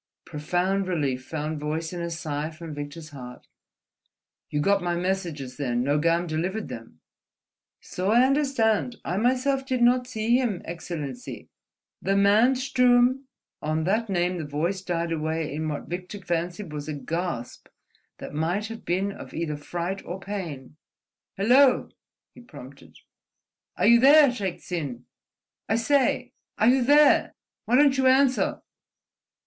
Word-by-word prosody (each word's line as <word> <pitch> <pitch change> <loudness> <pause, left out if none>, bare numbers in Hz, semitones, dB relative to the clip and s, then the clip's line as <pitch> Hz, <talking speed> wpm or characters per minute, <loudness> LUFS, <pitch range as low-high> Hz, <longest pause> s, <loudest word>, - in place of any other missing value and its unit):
Profound 180 +6 -1
relief 140 -8 -1
found 155 +1 -4
voice 160 +3 -3
in 175 - -4
a 170 - -3
sigh 155 -2 -3
from 165 0 -9
Victor's 145 +2 -7
heart. 125 -4 -10 1.0
"You 150 - -1
got 200 +6 +2
my 175 -1 -1
messages, 170 -8 -3
then? 125 -4 -1
Nogam 165 +5 +1
delivered 175 +6 -3
them?" 115 -9 -10 0.8
"So 185 +2 -3
I 240 +4 +5
understand. 255 -5 +1
I 180 - -2
myself 260 +4 +1
did 255 -2 0
not 250 +1 +3
see 235 0 +1
him, 235 -8 -1
Excellency. 160 -6 -7 0.5
The 195 +2 0
man 210 +6 +4
Sturm—" 250 0 +3 0.4
On 155 +1 -1
that 215 +6 0
name 180 -1 0
the - - -3
voice 160 +6 -2
died 170 -2 -2
away 160 -1 -2
in 155 +1 -3
what 150 - -5
Victor 180 +4 -6
fancied 175 -1 -3
was 150 0 -5
a 155 - -3
gasp 155 -4 -4 0.5
that - - -9
might 175 +8 -1
have 225 0 -8
been 190 +3 -1
of - - -10
either 160 -2 -2
fright 175 +6 -4
or 180 +2 -6
pain. 170 -9 -6 0.6
"Hello!" 250 +6 +4 0.4
he - - -14
prompted. 130 - -13 0.8
"Are 180 - +1
you 235 +2 +7
there, 285 +3 +7
Shaik 195 -7 -4
Tsin? 140 -9 -5 0.6
I 220 - +3
say! 250 +1 +1 0.2
Are 220 - +4
you 260 +1 +4
there? 290 +3 +5 0.3
Why 240 - +2
don't 280 0 +4
you 265 - +4
answer?" 260 0 +3
180 Hz, 145 wpm, -25 LUFS, 155-235 Hz, 1.0 s, you